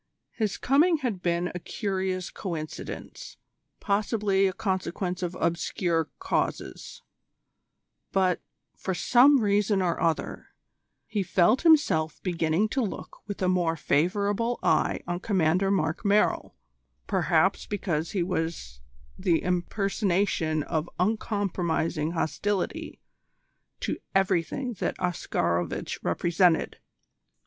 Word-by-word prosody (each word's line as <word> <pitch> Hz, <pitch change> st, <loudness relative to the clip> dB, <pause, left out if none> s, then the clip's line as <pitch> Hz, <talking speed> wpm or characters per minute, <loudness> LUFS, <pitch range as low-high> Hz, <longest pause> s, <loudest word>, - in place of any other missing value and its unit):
His 210 Hz, -7 st, -2 dB
coming 315 Hz, +6 st, +4 dB
had 205 Hz, -7 st, -2 dB
been 175 Hz, 0 st, 0 dB
a 180 Hz, -, -4 dB
curious 190 Hz, -1 st, -3 dB
coincidence, 160 Hz, -5 st, -6 dB, 0.4 s
possibly 200 Hz, -1 st, +1 dB
a -, -, 0 dB
consequence 185 Hz, -1 st, -2 dB
of 180 Hz, 0 st, -3 dB
obscure 170 Hz, -1 st, 0 dB
causes; -, -, -3 dB, 1.1 s
but, 185 Hz, -2 st, +2 dB, 0.3 s
for 190 Hz, -, -3 dB
some 260 Hz, +7 st, +5 dB
reason 205 Hz, -1 st, +2 dB
or 175 Hz, -3 st, 0 dB
other, 165 Hz, -2 st, -1 dB, 0.6 s
he 210 Hz, -2 st, -2 dB
felt 190 Hz, +6 st, +3 dB
himself 285 Hz, -, +3 dB
beginning 170 Hz, +2 st, +1 dB
to 265 Hz, -, 0 dB
look 215 Hz, -, -5 dB
with 205 Hz, -2 st, -4 dB
a -, -, +3 dB
more 175 Hz, -3 st, +2 dB
favourable 200 Hz, -, +1 dB
eye -, -, +2 dB
on 175 Hz, 0 st, -2 dB
Commander 185 Hz, -1 st, +2 dB
Mark 160 Hz, -5 st, 0 dB
Merrill 205 Hz, +1 st, +2 dB, 0.5 s
perhaps -, -, +2 dB
because 170 Hz, -6 st, -2 dB
he 185 Hz, -4 st, +1 dB
was 160 Hz, -, -3 dB, 0.4 s
the 180 Hz, -3 st, +2 dB
impersonation 180 Hz, -3 st, 0 dB
of 160 Hz, +2 st, -2 dB
uncompromising 180 Hz, -6 st, 0 dB
hostility 190 Hz, +4 st, -2 dB, 0.8 s
to -, -, -2 dB, 0.2 s
everything 195 Hz, -, +1 dB
that -, -, -1 dB
Oscarovitch 85 Hz, -, -1 dB
represented. 170 Hz, -, +2 dB
185 Hz, 105 wpm, -27 LUFS, 170-205 Hz, 1.1 s, some